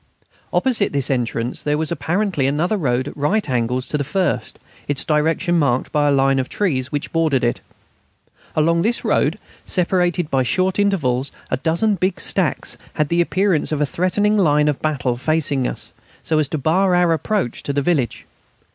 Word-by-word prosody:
Opposite 235 Hz, -, +1 dB
this 140 Hz, -1 st, +2 dB
entrance 120 Hz, -1 st, -2 dB
there 150 Hz, 0 st, 0 dB
was 160 Hz, +1 st, -1 dB
apparently 170 Hz, -1 st, 0 dB
another 160 Hz, +9 st, 0 dB
road 130 Hz, -7 st, 0 dB
at -, -, -12 dB
right 190 Hz, +9 st, 0 dB
angles 125 Hz, 0 st, -1 dB
to 150 Hz, -, -1 dB
the -, -, 0 dB
first, 145 Hz, -, -2 dB, 0.3 s
its 145 Hz, -1 st, +3 dB
direction 160 Hz, +3 st, +1 dB
marked 130 Hz, -4 st, 0 dB
by 150 Hz, -1 st, +2 dB
a -, -, +3 dB
line 135 Hz, -1 st, +3 dB
of 130 Hz, -, -3 dB
trees 140 Hz, -10 st, -1 dB
which 145 Hz, -1 st, -4 dB
bordered 160 Hz, -6 st, +1 dB
it. 120 Hz, -, 0 dB, 0.9 s
Along 165 Hz, +2 st, +2 dB
this 230 Hz, +6 st, 0 dB
road, -, -, +1 dB, 0.3 s
separated 175 Hz, -2 st, +1 dB
by 135 Hz, -, +2 dB
short 185 Hz, -, 0 dB
intervals, 140 Hz, -10 st, 0 dB, 0.2 s
a 130 Hz, -, +1 dB
dozen 170 Hz, -, +1 dB
big 190 Hz, 0 st, -1 dB
stacks -, -, 0 dB, 0.2 s
had 150 Hz, -2 st, 0 dB
the 170 Hz, 0 st, +2 dB
appearance 185 Hz, -2 st, +1 dB
of 155 Hz, -, -1 dB
a 150 Hz, -, +2 dB
threatening 205 Hz, +7 st, +1 dB
line 150 Hz, -4 st, +3 dB
of 150 Hz, -2 st, -1 dB
battle 130 Hz, -5 st, -1 dB
facing 145 Hz, -2 st, +1 dB
us, -, -, -6 dB, 0.3 s
so 155 Hz, -1 st, +1 dB
as 150 Hz, -, +2 dB
to 155 Hz, -, -3 dB
bar 180 Hz, +6 st, +2 dB
our 175 Hz, -1 st, +3 dB
approach 175 Hz, -, -2 dB
to -, -, -3 dB
the 140 Hz, 0 st, -1 dB
village. 140 Hz, -9 st, -1 dB
155 Hz, 180 wpm, -20 LUFS, 135-180 Hz, 0.9 s, its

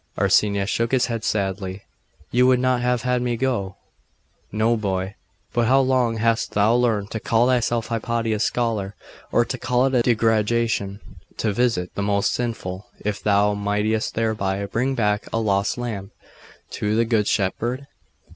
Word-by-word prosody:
Arsenius 100 Hz, 0 st, +2 dB
shook 115 Hz, +2 st, 0 dB
his 130 Hz, -2 st, +3 dB
head 115 Hz, -3 st, -4 dB
sadly. 95 Hz, -1 st, -2 dB, 0.5 s
'You 125 Hz, +1 st, +4 dB
would 130 Hz, -1 st, +4 dB
not 130 Hz, -1 st, +1 dB
have 125 Hz, -1 st, 0 dB
had 125 Hz, -1 st, +1 dB
me 120 Hz, -1 st, -1 dB
go?' 115 Hz, -7 st, -1 dB, 0.8 s
'No, 110 Hz, +3 st, +2 dB
boy. 95 Hz, -2 st, -2 dB, 0.4 s
But 120 Hz, -1 st, +2 dB
how 135 Hz, +3 st, +5 dB
long 130 Hz, -3 st, +1 dB
hast 115 Hz, +1 st, 0 dB
thou 105 Hz, +2 st, +3 dB
learned 115 Hz, -4 st, +1 dB
to 110 Hz, -, -3 dB
call 115 Hz, +2 st, +2 dB
thyself 120 Hz, -2 st, +1 dB
Hypatia's 115 Hz, -1 st, -1 dB
scholar, 110 Hz, -4 st, -1 dB, 0.4 s
or 120 Hz, -, +3 dB
to 125 Hz, -, -5 dB
call 125 Hz, +1 st, +1 dB
it 135 Hz, -, 0 dB
a 125 Hz, -, +4 dB
degradation 110 Hz, -3 st, +1 dB, 0.4 s
to 110 Hz, -2 st, 0 dB
visit 110 Hz, -6 st, 0 dB
the -, -, -3 dB
most 100 Hz, 0 st, +1 dB
sinful, 105 Hz, -6 st, -4 dB, 0.2 s
if 105 Hz, -1 st, -2 dB
thou 105 Hz, 0 st, +3 dB
mightest 105 Hz, +2 st, -1 dB
thereby 100 Hz, -3 st, -1 dB
bring 125 Hz, +7 st, -1 dB
back 105 Hz, -3 st, 0 dB
a -, -, -1 dB
lost 100 Hz, -1 st, 0 dB
lamb 110 Hz, -5 st, -4 dB, 0.6 s
to 105 Hz, +1 st, -1 dB
the 115 Hz, +1 st, +3 dB
Good 110 Hz, -3 st, +1 dB
Shepherd? 120 Hz, +7 st, -1 dB
110 Hz, 160 wpm, -22 LUFS, 100-120 Hz, 0.8 s, how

